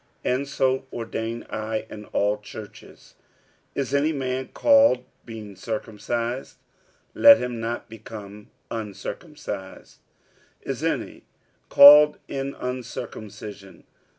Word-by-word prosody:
And 130 +3 0
so 130 -1 0
ordain 115 0 -4
I 110 0 -3
in 105 -1 -10
all 105 +1 0
churches. 105 0 -12 0.6
46:007:018 - - 0
Is 135 0 -4
any 145 +3 +2
man 130 -3 -3
called 275 - +4 0.2
being 110 -3 -9
circumcised? 115 +4 -4 0.6
let 285 -1 +8
him 125 -2 -4
not 115 +1 -4
become 105 -2 -11 0.2
uncircumcised. 100 -3 -7 0.6
Is - - -4
any - - -3 0.4
called 150 +1 +9
in 140 0 -4
uncircumcision? 110 -6 -7
115 Hz, 100 wpm, -24 LUFS, 105-130 Hz, 0.6 s, called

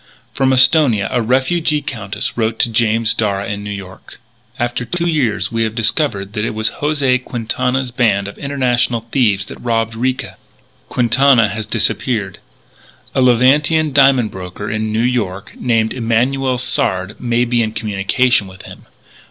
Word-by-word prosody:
From 135 -1 +1
Esthonia 130 -6 +4
a 125 - +1
refugee 135 +6 +1
Countess 105 -5 -4
wrote 115 -1 -1
to 115 - +1
James 115 0 +2
Darragh 100 -3 -1
in 100 0 -5
New 105 - -6
York: 95 -2 -9 0.2
" 120 0 -29
After 120 +1 -4
two 170 +8 -2
years 145 -10 0
we 115 0 -1
have 110 -1 -1
discovered 110 -4 -1
that 105 -2 -2
it 110 - -3
was 110 0 0
José 140 -4 +1
Quintana's 125 +2 -2
band 105 -5 +1
of 100 - -8
international 125 -4 0
thieves 105 -7 +1
that - - -11
robbed 115 -1 -1
Ricca. 130 +4 -3 0.5
Quintana 125 -1 +3
has 110 +1 -5
disappeared. 105 -7 -1 0.7
"A - - +1
Levantine 140 +5 +3
diamond 135 -5 +4
broker 95 +2 -7
in 110 0 -2
New 110 +1 0
York, 105 -6 -2
named 115 -3 0
Emanuel 125 +2 0
Sard, 95 -5 -1
may 120 0 +1
be 120 0 +1
in 110 -1 -1
communication 105 +2 0
with 95 0 -13
him. - - -13
115 Hz, 155 wpm, -17 LUFS, 110-130 Hz, 0.7 s, Esthonia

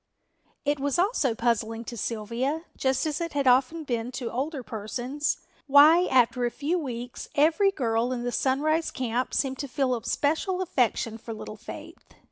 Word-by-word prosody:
It 290 0 +1
was 280 0 0
also 345 - +2
puzzling 225 -1 0
to 235 - -7
Sylvia, 235 +8 -2
just 265 +1 0
as 310 +2 -2
it 335 -2 -3
has 285 -1 0
often 260 +6 +3
been 240 -3 -2
to 245 -3 -4
older 270 +2 -3
persons, 245 +7 -3 0.3
why 305 +6 +7
after 250 -1 +3
a 240 - +2
few 300 +9 -1
weeks 245 -4 -6
every 320 +7 +4
girl 240 -8 0
in 245 -1 -2
the 245 - -1
Sunrise 305 +6 +1
camp 250 -1 -2
seemed 265 -2 0
to 280 - -3
feel 260 -1 0
a 230 - -6
special 325 +6 0
affection 245 -9 0
for 225 0 -7
little 215 - -8
Faith. - - -10
260 Hz, 170 wpm, -27 LUFS, 235-295 Hz, 0.3 s, why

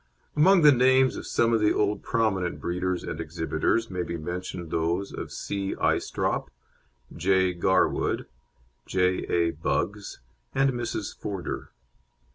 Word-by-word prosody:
Among 175 +3 +5
the 150 - +9
names 130 0 +4
of - - -7
some 115 0 +2
old 105 -2 +2
prominent 105 -7 0
breeders 90 +1 -2
and 80 - -4
exhibitors 80 +7 -1
may 90 -1 -2
be 85 0 -4
mentioned 85 +1 -5
those 85 +4 -1
of - - -6
C. 100 -1 -3
Aistrop, - - 0 0.7
J. 95 -1 +2
Garwood, 90 +1 +1 0.6
J. 90 0 +1
A. 85 -1 +2
Buggs, 80 +7 -2 0.4
and 135 0 +3
Mrs. 120 -4 -4
Forder. 95 -6 -5
95 Hz, 120 wpm, -26 LUFS, 85-115 Hz, 0.7 s, the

